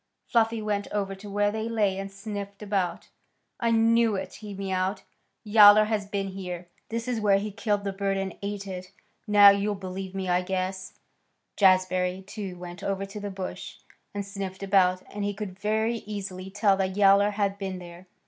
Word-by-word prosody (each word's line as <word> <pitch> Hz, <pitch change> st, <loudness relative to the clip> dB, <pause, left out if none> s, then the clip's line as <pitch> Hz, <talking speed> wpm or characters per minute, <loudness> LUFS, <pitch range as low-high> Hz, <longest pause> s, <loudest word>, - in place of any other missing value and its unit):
Fluffy 225 Hz, -1 st, +1 dB
went 205 Hz, -1 st, -1 dB
over 200 Hz, -2 st, -1 dB
to 200 Hz, +2 st, -10 dB
where 205 Hz, +1 st, +1 dB
they 220 Hz, +1 st, -3 dB
lay 205 Hz, -4 st, +1 dB
and 195 Hz, 0 st, -5 dB
sniffed 200 Hz, 0 st, -7 dB
about. 195 Hz, -4 st, -2 dB, 0.5 s
"I 235 Hz, -, +1 dB
knew 230 Hz, -1 st, +4 dB
it," 190 Hz, -, -5 dB
he 210 Hz, -2 st, -8 dB
mewed. 190 Hz, 0 st, -2 dB, 0.4 s
"Yowler 210 Hz, -1 st, +8 dB
has 210 Hz, -2 st, -1 dB
been 200 Hz, -1 st, -2 dB
here. 180 Hz, -2 st, -6 dB, 0.2 s
This 230 Hz, +1 st, -3 dB
is 240 Hz, -3 st, -1 dB
where 200 Hz, -2 st, +4 dB
he 210 Hz, +1 st, -3 dB
killed 205 Hz, -1 st, -1 dB
the 200 Hz, -1 st, -2 dB
bird 195 Hz, 0 st, -1 dB
and 195 Hz, -2 st, -3 dB
ate 200 Hz, 0 st, -4 dB
it. 185 Hz, -1 st, -7 dB, 0.4 s
Now 205 Hz, -1 st, +8 dB
you'll 200 Hz, +1 st, 0 dB
believe 190 Hz, 0 st, -6 dB
me, 190 Hz, -1 st, -3 dB
I 180 Hz, 0 st, +2 dB
guess." 185 Hz, +1 st, -3 dB, 0.6 s
Jazbury, 185 Hz, -1 st, +3 dB
too, 200 Hz, -3 st, -6 dB
went 175 Hz, 0 st, -9 dB
over 195 Hz, 0 st, -2 dB
to 195 Hz, +2 st, -8 dB
the 205 Hz, 0 st, -4 dB
bush 190 Hz, -1 st, -6 dB, 0.4 s
and 200 Hz, -1 st, -4 dB
sniffed 195 Hz, -1 st, -6 dB
about, 185 Hz, -2 st, +3 dB
and 205 Hz, 0 st, -3 dB
he 205 Hz, 0 st, -2 dB
could 200 Hz, -2 st, -6 dB
very 220 Hz, +3 st, 0 dB
easily 190 Hz, -3 st, -6 dB
tell 200 Hz, 0 st, +3 dB
that 190 Hz, 0 st, -1 dB
Yowler 200 Hz, 0 st, +6 dB
had 200 Hz, -1 st, -1 dB
been 190 Hz, -2 st, -4 dB
there. 175 Hz, +1 st, -11 dB
200 Hz, 185 wpm, -27 LUFS, 190-210 Hz, 0.6 s, Yowler